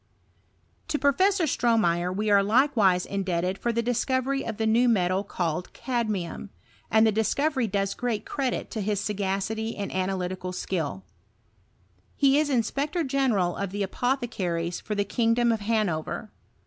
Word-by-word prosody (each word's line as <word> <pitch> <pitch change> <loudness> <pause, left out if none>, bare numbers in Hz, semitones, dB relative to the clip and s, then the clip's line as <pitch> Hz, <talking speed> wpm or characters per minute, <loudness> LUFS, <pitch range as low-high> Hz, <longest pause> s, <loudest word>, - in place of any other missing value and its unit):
To - - 0
Professor 365 +7 +3
Stromeyer 210 - +2
we 210 +3 -1
are 200 -1 +6
likewise 210 -5 +3
indebteil 185 -1 -2
Ar 235 - +2
the 235 0 0
discovery 260 +3 0
of 220 -2 -5
the 220 - 0
new 235 +3 +4
metal 185 -3 +2
called 175 -3 -3
cadmium; 215 -7 -3 0.4
and 220 +1 +5
the 220 - +4
discovery 260 +4 +1
^oes 195 -1 -1
great 240 -4 -2
credit 265 -3 -2
to 220 - -3
his 205 0 0
sagacity 210 +2 -2
mad 200 -1 -4
analytical 185 -1 -2
skill. 155 - -3 1.1
He 280 +1 +4
is 305 -1 +1
inspector 280 +6 0
general 255 - +1
of 200 -1 -3
the 200 +2 -2
apothecaries 190 -7 -2
for 210 - -4
the 205 0 0
kingdom 235 +2 +2
of 225 - 0
Hanover. 210 -2 -1
215 Hz, 145 wpm, -26 LUFS, 190-245 Hz, 1.1 s, are